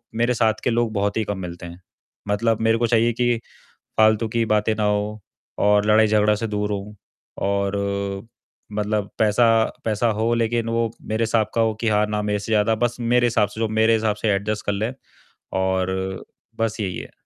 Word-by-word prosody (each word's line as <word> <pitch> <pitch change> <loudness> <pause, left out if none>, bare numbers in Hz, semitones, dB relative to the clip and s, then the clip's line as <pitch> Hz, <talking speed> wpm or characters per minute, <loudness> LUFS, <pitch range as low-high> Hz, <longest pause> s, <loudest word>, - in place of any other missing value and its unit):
मेरे 120 +2 +2
साथ 110 -2 +2
के - - +1
लोग 120 -1 +1
बहुत 100 +1 0
ही 110 - +1
कम 105 -1 -3
मिलते 85 -1 -7
हैं, 85 +1 -10 0.5
मतलब 110 +2 +1
मेरे 115 0 +3
को 120 0 +1
चाहिए 115 0 +3
कि 120 0 +1 0.6
फालतू 110 +1 +4
की 115 +1 0
बातें 105 0 +1
ना 105 - -1
हो 105 +1 0 0.4
और 105 0 +4
लड़ाई-झगड़ा 105 -1 +4
से 115 +2 -3
दूर 105 0 -2
होऊँ 105 +1 -5 0.5
और 100 0 0 1.0
मतलब 105 -1 -1
पैसा 110 +2 +4 0.4
पैसा 110 +2 +1
हो 115 +1 +2
लेकिन 115 0 0
वो 115 0 0 0.2
मेरे 110 +1 0
हिसाब 110 -1 +1
का 115 - +3
हो 110 -1 +2
कि 115 - +1
हाँ, 105 0 +3
ना 105 0 -1
मेरे 105 0 -1
से 105 +2 -6
ज़्यादा 110 +1 +3
बस 120 +1 -1
मेरे 120 +1 +2
हिसाब 105 -3 +2
से 110 - -10
जो 115 - +2
मेरे 110 +1 +3
हिसाब 110 -1 +1
से 105 +1 -1
एडजस्ट 105 +2 -2
कर 100 - 0
ले 110 +5 -2 0.7
और 95 0 -1 0.3
बस 115 0 -1
यही 95 -4 -2
है। - - -8
110 Hz, 195 wpm, -22 LUFS, 105-115 Hz, 1.0 s, फालतू